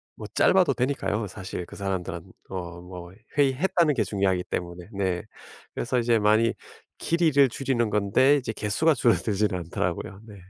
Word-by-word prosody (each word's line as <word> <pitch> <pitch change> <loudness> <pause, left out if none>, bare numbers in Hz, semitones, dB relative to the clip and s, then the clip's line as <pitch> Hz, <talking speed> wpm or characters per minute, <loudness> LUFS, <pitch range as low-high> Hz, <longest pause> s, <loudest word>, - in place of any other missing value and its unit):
뭐 - - -8
짧아도 180 -8 +3
되니까요. 120 -4 -1
사실 95 -2 -6
그 - - -12
사람들은 95 -3 -3 0.3
어 85 -2 -6
뭐 90 -1 -10 0.3
회의했다는 150 +4 +3
게 - - +2
중요하기 95 -3 0
때문에. 90 +2 -5
네. 95 -3 -1 0.5
그래서 125 +1 -1
이제 115 -1 +2
많이 110 +2 +3 0.4
길이를 155 -5 +3
줄이는 120 -2 -1
건데 105 +7 +3
이제 125 -4 -3
개수가 125 +11 +1
줄어들지는 105 -4 +1
않더라고요 90 +3 -3
네. 105 - -11
105 Hz, 355 characters per minute, -26 LUFS, 95-130 Hz, 0.5 s, 짧아도